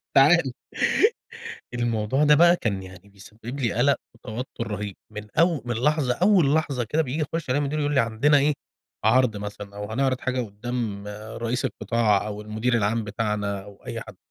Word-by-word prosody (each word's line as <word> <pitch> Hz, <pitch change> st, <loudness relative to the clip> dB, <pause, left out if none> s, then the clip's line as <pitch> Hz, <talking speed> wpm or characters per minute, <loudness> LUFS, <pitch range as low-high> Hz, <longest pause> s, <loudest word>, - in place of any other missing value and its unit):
تعالَ. 140 Hz, -1 st, +5 dB, 1.2 s
الموضوع 120 Hz, +3 st, +1 dB
ده 150 Hz, 0 st, +6 dB
بقى 170 Hz, +3 st, +6 dB
كان 100 Hz, -, -2 dB
يعني 95 Hz, +1 st, -13 dB
بيسبب 110 Hz, +6 st, -9 dB
لي 115 Hz, -5 st, +1 dB
قلق 135 Hz, +5 st, +3 dB, 0.2 s
وتوتر 115 Hz, +1 st, -6 dB
رهيب 105 Hz, -2 st, -4 dB
من 105 Hz, 0 st, -8 dB
أو 165 Hz, -3 st, +3 dB
من 120 Hz, -1 st, -2 dB
لحظة 135 Hz, 0 st, +1 dB
أول 180 Hz, -4 st, +4 dB
لحظة 140 Hz, -6 st, 0 dB
كده 150 Hz, +8 st, +1 dB
بييجي 145 Hz, +2 st, -3 dB
يخش 165 Hz, -5 st, -2 dB
علي 130 Hz, -, +2 dB
المدير 145 Hz, +1 st, -1 dB
يقول 145 Hz, 0 st, 0 dB
لي: 135 Hz, -, +5 dB
"عندنا 115 Hz, +6 st, +3 dB
إيه، 145 Hz, +2 st, +3 dB, 0.5 s
عرض 115 Hz, 0 st, +4 dB
مثلًا"، 100 Hz, 0 st, -7 dB
أو 105 Hz, +1 st, -6 dB
"هنعرض 130 Hz, +1 st, +1 dB
حاجة 130 Hz, 0 st, -1 dB
قدام 110 Hz, -1 st, -4 dB, 0.3 s
رئيس 120 Hz, +2 st, -2 dB
القطاع"، 110 Hz, -4 st, +1 dB
أو 105 Hz, 0 st, -5 dB
المدير 110 Hz, +3 st, -1 dB
العام 110 Hz, 0 st, +1 dB
بتاعنا، 105 Hz, -2 st, -2 dB
أو 100 Hz, -1 st, -15 dB
أي -, -, -4 dB
حد. -, -, -11 dB
120 Hz, 170 wpm, -25 LUFS, 105-140 Hz, 1.2 s, ده